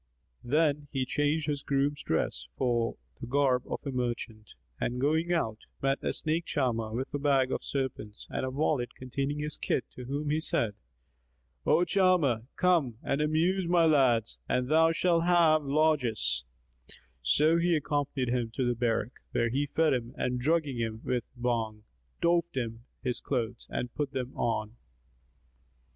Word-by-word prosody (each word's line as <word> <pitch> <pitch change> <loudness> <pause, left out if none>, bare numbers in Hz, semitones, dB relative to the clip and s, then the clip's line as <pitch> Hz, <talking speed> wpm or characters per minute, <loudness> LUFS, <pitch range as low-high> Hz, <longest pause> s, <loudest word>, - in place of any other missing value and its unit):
Then 150 +2 +1
he 135 -3 0
changed 145 +4 0
his 145 -2 -1
groom's 140 +1 0
dress 60 -6 -1
for 120 -2 0 0.2
the 120 - -6
garb 130 -1 +2
of - - -2
a 140 - -2
merchant 120 -4 -4 0.2
and 125 +1 -1
going 160 +5 +1
out, 110 -11 0 0.2
met 135 0 0
a - - +1
snake 165 +2 -1
charmer, 115 -5 -1
with 125 +4 -4
a 145 - -1
bag 135 -2 +2
of - - -2
serpents 130 -6 -4
and - - -2
a 130 - -1
wallet 135 -2 0
containing 135 +3 -3
his 150 0 -2
kit 125 - -1
to 125 - -9
whom 145 +3 -2
said 115 -9 0 0.9
he, - - -2
"O 175 - +5
charmer, 170 - +3
come 165 -11 +2
and 140 +2 0
amuse 170 +5 +1
my 170 -1 +4
lads, 130 -8 +3
and 125 0 0
thou 160 +1 +5
shalt 170 0 +2
have 170 -3 +5
largesse." 130 - +1 0.8
So 150 - +4
he 170 0 +3
accompanied 145 -3 -1
him 120 -2 0
to 130 - 0
the 120 - +2
barrack, 115 -1 0 0.2
where 115 - +2
he 140 +5 0
fed 160 +1 +2
him 120 -2 -3
and 125 0 -1
drugging 150 -1 +1
him 110 -1 -3
with 125 -2 -1
Bhang, 115 -3 -2 0.4
doffed 170 -3 +2 0.5
his 125 -2 -2
clothes 120 -5 -3
and 125 -1 -3
put 145 -1 -3
them 130 -1 -4
on. 110 -1 -1
135 Hz, 160 wpm, -29 LUFS, 120-155 Hz, 0.9 s, O